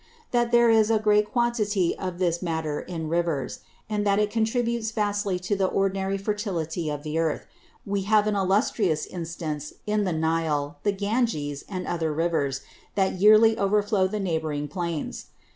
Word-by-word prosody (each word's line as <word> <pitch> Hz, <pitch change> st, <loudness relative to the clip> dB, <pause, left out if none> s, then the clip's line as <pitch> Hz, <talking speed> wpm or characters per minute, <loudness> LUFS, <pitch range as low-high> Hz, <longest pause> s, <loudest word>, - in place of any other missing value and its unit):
That 240 Hz, -1 st, +1 dB
there 235 Hz, -1 st, +5 dB
is 220 Hz, -1 st, +4 dB
a 225 Hz, -, +4 dB
great 210 Hz, 0 st, +2 dB
Quantity 220 Hz, -7 st, +1 dB
of 185 Hz, -2 st, -5 dB
this 175 Hz, -2 st, 0 dB
Matter 160 Hz, -4 st, -2 dB
in 165 Hz, -3 st, -5 dB
Rivers; 165 Hz, -5 st, -1 dB, 0.3 s
and 210 Hz, -1 st, -1 dB
that 200 Hz, -1 st, +2 dB
it 210 Hz, 0 st, +1 dB
contributes 230 Hz, 0 st, 0 dB
vastly 205 Hz, -3 st, -1 dB
to 185 Hz, +3 st, -2 dB
the 190 Hz, -1 st, +1 dB
ordinary 195 Hz, 0 st, 0 dB
Fertility 185 Hz, -6 st, -2 dB
of 145 Hz, -1 st, -4 dB
the 155 Hz, +1 st, -2 dB
Earth, 160 Hz, -2 st, -1 dB, 0.4 s
we 200 Hz, 0 st, -1 dB
have 215 Hz, -1 st, +5 dB
an 210 Hz, -1 st, 0 dB
illustrious 195 Hz, -, +1 dB
Instance 160 Hz, -4 st, -5 dB
in 210 Hz, 0 st, +1 dB
the 185 Hz, -, 0 dB
Nile, 160 Hz, -3 st, -1 dB
the 205 Hz, -, +2 dB
Ganges, 200 Hz, -, -1 dB
and 185 Hz, -2 st, -4 dB
other 165 Hz, -2 st, -1 dB
Rivers 150 Hz, -4 st, 0 dB, 0.3 s
that 190 Hz, -2 st, +1 dB
yearly 215 Hz, +2 st, +7 dB
overflow 200 Hz, -1 st, +2 dB
the 210 Hz, +2 st, -3 dB
neighbouring 160 Hz, -5 st, -2 dB
Plains. 170 Hz, -3 st, -4 dB
190 Hz, 160 wpm, -25 LUFS, 160-210 Hz, 0.4 s, yearly